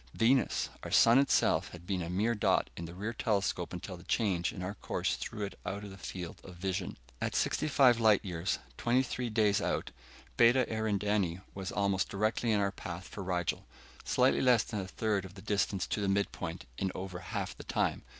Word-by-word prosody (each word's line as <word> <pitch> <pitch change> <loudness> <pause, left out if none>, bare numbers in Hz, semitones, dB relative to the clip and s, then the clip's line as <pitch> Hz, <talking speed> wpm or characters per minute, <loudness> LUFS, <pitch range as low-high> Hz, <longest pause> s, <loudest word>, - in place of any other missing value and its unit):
Venus! 125 +3 +2
Our - - -6
sun 115 +3 +6
itself 140 - +3
had 90 -1 -10
been 95 -1 -1
a 85 - -4
mere 105 +6 +1
dot 105 - +1
in 85 - -5
the 85 +1 -9
rear 105 +5 -3
telescope 100 -5 0
until 90 +1 -6
the 85 - -13
change 95 -5 +1
in 90 - -6
our 95 +2 -3
course - - -1
threw 105 - -5
it 100 - -9
out 100 +2 -4
of 100 - -8
the 95 - -10
field 90 -2 -6
of 90 - -11
vision. 95 +1 -3 0.2
At - - -1
sixty - - +1
five 130 -5 +5
light 110 -2 +4
years, 85 -1 -1 0.2
twenty 125 +2 +2
three 125 -1 -3
days 105 -2 +3
out, - - -1 0.5
Beta 120 +2 +6
Eridani 105 -4 0
was 95 -1 -5
almost 100 -1 +1
directly 110 +3 0
in 105 - +3
our 100 -1 +1
path 90 -2 -7
for 105 - -7
Rigel. 90 -2 -2 0.4
Slightly 125 +1 +3
less 125 -4 +5
than 105 - -4
a 95 - -4
third 105 0 -1
of 95 0 -10
the 95 - -10
distance 100 -2 0
to 105 - -2
the 100 - +1
midpoint, 100 +1 -2
in 95 -1 0
over 90 -1 -5
half 95 +1 -4
the - - -10
time. - - 0
100 Hz, 205 wpm, -32 LUFS, 95-110 Hz, 0.5 s, sun